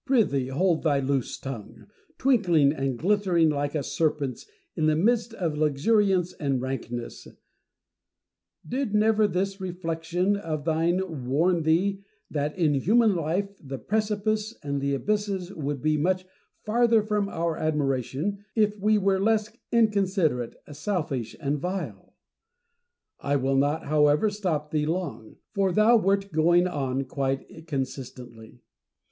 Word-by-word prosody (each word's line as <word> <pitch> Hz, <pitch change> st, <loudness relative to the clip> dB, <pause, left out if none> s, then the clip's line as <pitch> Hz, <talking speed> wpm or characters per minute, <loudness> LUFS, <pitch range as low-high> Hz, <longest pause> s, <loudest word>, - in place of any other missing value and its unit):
Prythee 220 Hz, -, +2 dB
hold 165 Hz, +5 st, +1 dB
thy 145 Hz, -4 st, +2 dB
loose 135 Hz, -2 st, -1 dB
tongue, 125 Hz, -6 st, -8 dB, 0.3 s
twinkling 175 Hz, -, +3 dB
and 135 Hz, -4 st, -2 dB
glittering 180 Hz, -, +2 dB
like 145 Hz, 0 st, -1 dB
a 150 Hz, -, 0 dB
serpent's 145 Hz, -3 st, -1 dB, 0.3 s
in 155 Hz, -2 st, +1 dB
the 155 Hz, -, +3 dB
midst 230 Hz, +7 st, +2 dB
of 170 Hz, -7 st, -2 dB
luxuriance 180 Hz, +5 st, +2 dB
and 140 Hz, -4 st, -1 dB
rankness! 120 Hz, -2 st, -5 dB, 1.4 s
Did 250 Hz, -4 st, -2 dB
never 215 Hz, 0 st, +4 dB
this 195 Hz, +1 st, -2 dB
reflection 175 Hz, +1 st, -1 dB
of 155 Hz, -7 st, -4 dB
thine 165 Hz, -3 st, 0 dB
warn 165 Hz, +6 st, +2 dB
thee 185 Hz, +5 st, +1 dB, 0.3 s
that, 150 Hz, +1 st, -2 dB
in 160 Hz, -5 st, +3 dB
human 215 Hz, -, +3 dB
life, 180 Hz, +5 st, -2 dB
the 135 Hz, -2 st, -6 dB
precipices 215 Hz, -, -1 dB
and 140 Hz, -1 st, -2 dB
abysses 195 Hz, +6 st, -1 dB
would 145 Hz, -3 st, -4 dB
be 155 Hz, 0 st, +2 dB
much 185 Hz, +4 st, 0 dB, 0.4 s
farther 230 Hz, 0 st, +3 dB
from 210 Hz, -1 st, -1 dB
our 165 Hz, -2 st, -1 dB
admiration 150 Hz, -, -1 dB
if 210 Hz, -2 st, +2 dB
we 215 Hz, +2 st, +3 dB
were 195 Hz, -1 st, +2 dB
less 215 Hz, +1 st, +1 dB, 0.2 s
incon 215 Hz, -4 st, +3 dB
siderate, 155 Hz, -, 0 dB, 0.2 s
selfish, 150 Hz, -, -3 dB
and 145 Hz, -1 st, -1 dB
vile 185 Hz, +5 st, -5 dB, 0.5 s
% 480 Hz, 0 st, -53 dB, 0.3 s
I 140 Hz, -, 0 dB
will 135 Hz, 0 st, +1 dB
not 145 Hz, +3 st, +1 dB
however 150 Hz, +6 st, +3 dB
stop 165 Hz, -8 st, -2 dB
thee 150 Hz, -1 st, 0 dB
long, 155 Hz, -11 st, -4 dB, 0.2 s
for 195 Hz, -2 st, +1 dB
thou 215 Hz, +6 st, +5 dB
wert 200 Hz, -1 st, +1 dB
going 170 Hz, +3 st, +4 dB
on 135 Hz, -5 st, -2 dB
quite 135 Hz, +4 st, -4 dB
consistently. 125 Hz, -5 st, -6 dB
165 Hz, 135 wpm, -26 LUFS, 140-200 Hz, 1.4 s, thou